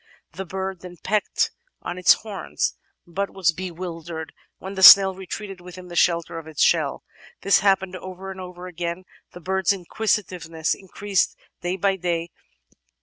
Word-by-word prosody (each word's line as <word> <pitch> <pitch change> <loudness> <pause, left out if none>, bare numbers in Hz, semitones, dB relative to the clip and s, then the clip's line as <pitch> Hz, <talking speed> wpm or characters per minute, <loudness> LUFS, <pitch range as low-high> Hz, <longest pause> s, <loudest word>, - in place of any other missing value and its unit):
The 190 +3 -6
bird 190 0 -4
then 180 -1 -10
pecked 210 +5 0 0.3
at 175 - -4
its 180 - +7
horns, 200 -7 -3 0.3
but 195 +3 -3
was 185 -3 +1
bewildered 170 -2 -6 0.2
when 190 +1 -7
the 190 - -4
snail 190 0 +10
retreated 190 0 -7
within 180 0 -11
the 175 - -8
shelter 170 -1 +2
of 160 - -12
its 155 -2 0
shell. - - +2 0.4
This 200 - +4
happened 190 -2 +2
over 185 +1 -8
and 190 0 -8
over 180 0 -9
again, 175 0 -4 0.3
the - - -9
bird's 190 +2 +1
inquisitiveness 180 -4 -1
increasing 195 0 -1 0.2
day 175 +1 -1
by 195 +1 +1
day. 170 -2 -2
185 Hz, 150 wpm, -23 LUFS, 170-190 Hz, 0.4 s, snail